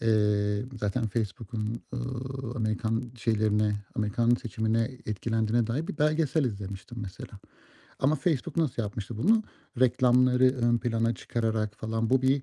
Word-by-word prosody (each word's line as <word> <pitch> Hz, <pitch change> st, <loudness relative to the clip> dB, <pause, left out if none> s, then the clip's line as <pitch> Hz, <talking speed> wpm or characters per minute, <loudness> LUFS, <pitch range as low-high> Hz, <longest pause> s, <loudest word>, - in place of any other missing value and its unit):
eee, 105 Hz, -1 st, +2 dB, 0.2 s
zaten 105 Hz, +3 st, 0 dB
Facebook'un, 110 Hz, +1 st, -3 dB
ııı, 130 Hz, 0 st, -4 dB
Amerikan 115 Hz, +1 st, -1 dB
şeylerine 105 Hz, -2 st, +2 dB, 0.2 s
Amerikan 115 Hz, +2 st, +2 dB
seçimine 115 Hz, -2 st, 0 dB, 0.2 s
etkilendiğine 110 Hz, +2 st, 0 dB
dair 135 Hz, +8 st, -2 dB
bir -, -, -5 dB
belgesel 155 Hz, -1 st, +2 dB
izlemiştim 100 Hz, +1 st, -5 dB
mesela 100 Hz, +1 st, -8 dB, 0.6 s
ama 140 Hz, +3 st, +3 dB
Facebook 150 Hz, -1 st, -1 dB
nasıl 150 Hz, -8 st, +1 dB
yapmıştı 105 Hz, +1 st, -5 dB
bunu, 220 Hz, -, +4 dB, 0.4 s
reklamları 125 Hz, 0 st, +4 dB
ön 120 Hz, -2 st, +2 dB
plana 115 Hz, 0 st, 0 dB
çıkararak 110 Hz, -2 st, -1 dB
falan. 110 Hz, 0 st, -2 dB
Bu 130 Hz, 0 st, +4 dB
bir 135 Hz, +1 st, +3 dB
115 Hz, 125 wpm, -28 LUFS, 110-125 Hz, 0.6 s, bunu